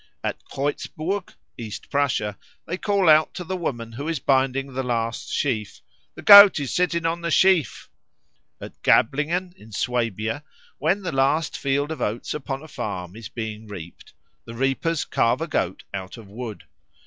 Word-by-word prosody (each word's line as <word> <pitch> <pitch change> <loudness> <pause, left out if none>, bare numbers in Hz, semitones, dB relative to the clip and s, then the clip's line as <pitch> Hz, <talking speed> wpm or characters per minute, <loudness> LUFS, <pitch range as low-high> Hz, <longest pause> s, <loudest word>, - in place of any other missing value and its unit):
At - - -3
Kreutzburg, 155 +7 -3 0.2
East 110 -3 -7
Prussia, 130 -8 0 0.3
they 175 - -3
call 200 -1 +1
out 155 0 +5
to 180 - -5
the 185 +2 -4
woman 120 -10 -4
who 140 +7 -6
is 165 -1 -1
binding 135 0 +1
the 130 - -1
last 115 -2 -2
sheaf, 110 -7 -2 0.4
"The - - -10
Goat 200 -4 +10
is 140 -3 -3
sitting 170 -2 +1
in 165 +1 -1
the 170 - -2
sheaf." 185 -2 +3 0.7
At - - -11
Gablingen, 165 +9 +2
in 110 +1 -16
Swabia, 115 +3 -2 0.4
when 190 +7 +1
the 180 - -2
last 140 +4 +1
field 140 +2 -1
of 155 -5 -5
oats 110 +2 -2
upon 135 -1 -5
a - - -10
farm 100 - -5
is 110 -2 -9
being 110 -2 -6
reaped, 85 -5 -10 0.3
the 115 - -9
reapers 135 +6 0
carve 120 +3 +1
a - - 0
goat 95 - -2
out 95 +2 -6
of 110 -3 -12
wood. 110 +1 -7
135 Hz, 165 wpm, -23 LUFS, 115-165 Hz, 0.7 s, Goat